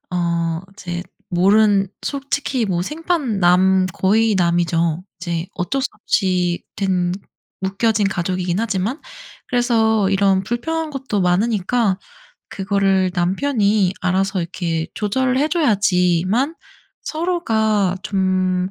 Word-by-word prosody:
어 170 Hz, -1 st, -1 dB
이제 175 Hz, -2 st, -5 dB, 0.3 s
모른 195 Hz, +2 st, +4 dB, 0.2 s
솔직히 275 Hz, -3 st, -2 dB
뭐 175 Hz, -2 st, 0 dB
생판 300 Hz, -, -2 dB
남, 185 Hz, +1 st, +4 dB
거의 215 Hz, +4 st, +2 dB
남이죠. 170 Hz, -1 st, +1 dB, 0.2 s
이제 170 Hz, -1 st, -3 dB
어쩔 230 Hz, +10 st, -1 dB
수 275 Hz, -, 0 dB
없이 180 Hz, -4 st, 0 dB
된 185 Hz, -3 st, 0 dB, 0.5 s
묶여진 200 Hz, +2 st, +1 dB
가족이긴 180 Hz, 0 st, -1 dB
하지만 225 Hz, -, -2 dB, 0.5 s
그래서 225 Hz, -5 st, +2 dB
이런 195 Hz, -1 st, +2 dB
불편한 315 Hz, +8 st, -2 dB
것도 265 Hz, -8 st, -2 dB
많으니까 200 Hz, +2 st, +1 dB, 0.5 s
그거를 195 Hz, -1 st, +1 dB
남편이 200 Hz, +1 st, +1 dB
알아서 190 Hz, +1 st, 0 dB
이렇게 165 Hz, -1 st, -3 dB
조절 255 Hz, +5 st, 0 dB
해 295 Hz, +3 st, +2 dB
줘야지만 205 Hz, -, +2 dB, 0.5 s
서로가 220 Hz, -, 0 dB
좀 185 Hz, -1 st, 0 dB
195 Hz, 230 characters per minute, -20 LUFS, 180-225 Hz, 0.5 s, 모른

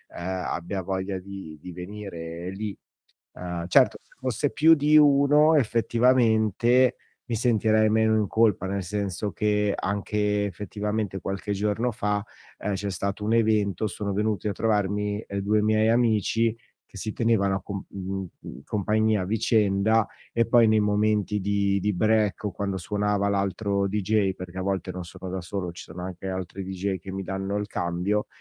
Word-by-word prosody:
ehm, 85 Hz, -, -5 dB, 0.2 s
abbia 95 Hz, +3 st, -3 dB
voglia 95 Hz, +1 st, -2 dB
di 95 Hz, -4 st, -9 dB
di 90 Hz, +4 st, -9 dB
venire 90 Hz, -2 st, -7 dB
lì. 100 Hz, +1 st, -5 dB, 0.6 s
Uhm, 90 Hz, -1 st, -5 dB
certo -, -, +4 dB
se -, -, -27 dB
fosse 130 Hz, +2 st, -1 dB
più 160 Hz, +2 st, +5 dB
di 150 Hz, 0 st, +3 dB
1 150 Hz, +2 st, +6 dB
effettivamente 120 Hz, 0 st, +3 dB, 0.3 s
mi 120 Hz, -, -3 dB
sentirei 110 Hz, -2 st, +3 dB
meno 110 Hz, 0 st, +3 dB
in 105 Hz, -, +1 dB
colpa, 110 Hz, -4 st, +2 dB
nel 100 Hz, 0 st, -2 dB
senso 100 Hz, +1 st, -3 dB
che 105 Hz, +2 st, +1 dB
anche 105 Hz, +1 st, -1 dB
effettivamente, 105 Hz, +1 st, -3 dB
qualche 100 Hz, +1 st, -3 dB
giorno 105 Hz, +4 st, 0 dB
fa, 105 Hz, 0 st, -1 dB, 0.3 s
ehm, 105 Hz, -, -3 dB
c'è 100 Hz, +1 st, -3 dB
stato 100 Hz, +3 st, -3 dB
un 110 Hz, -, +1 dB
evento, 110 Hz, -3 st, +2 dB
sono 100 Hz, -1 st, -3 dB
venuti 105 Hz, 0 st, 0 dB
a 100 Hz, -, 0 dB
trovarmi, 105 Hz, -1 st, 0 dB
ehm, 100 Hz, 0 st, -3 dB
2 105 Hz, +2 st, +2 dB
miei 110 Hz, +1 st, +3 dB
amici 115 Hz, -1 st, +2 dB, 0.3 s
che 100 Hz, -, -13 dB
si 110 Hz, +2 st, -4 dB
tenevano 110 Hz, -4 st, +2 dB
a 95 Hz, -, -5 dB
comp 100 Hz, 0 st, -6 dB
mhmm, 95 Hz, 0 st, -5 dB
mhmm, -, -, -10 dB
compagnia 105 Hz, 0 st, +1 dB
a -, -, -2 dB
vicenda 105 Hz, +1 st, +2 dB, 0.2 s
e 115 Hz, -, +2 dB
poi 115 Hz, -1 st, +5 dB
nei 110 Hz, 0 st, +4 dB
momenti 105 Hz, 0 st, +1 dB
di 100 Hz, 0 st, +1 dB
di 105 Hz, +1 st, 0 dB
break 110 Hz, +1 st, +1 dB
o 105 Hz, -, 0 dB
quando 100 Hz, -2 st, -3 dB
suonava 100 Hz, +2 st, 0 dB
l'altro 100 Hz, 0 st, 0 dB
deejay, 105 Hz, -1 st, +1 dB
perché 90 Hz, 0 st, -8 dB
a -, -, -2 dB
volte 95 Hz, -1 st, -2 dB
non 90 Hz, 0 st, -6 dB
sono 90 Hz, +2 st, -8 dB
da 95 Hz, -, -3 dB
solo, 90 Hz, 0 st, -4 dB
ci 85 Hz, -, -10 dB
sono 90 Hz, +2 st, -9 dB
anche 95 Hz, +1 st, -6 dB
altri 95 Hz, +1 st, -5 dB
deejay 95 Hz, +1 st, -3 dB
che 95 Hz, +2 st, -9 dB
mi 95 Hz, 0 st, -4 dB
danno 95 Hz, +1 st, -3 dB
il 105 Hz, 0 st, -2 dB
cambio, 90 Hz, +3 st, -1 dB
105 Hz, 170 wpm, -26 LUFS, 95-110 Hz, 0.6 s, 1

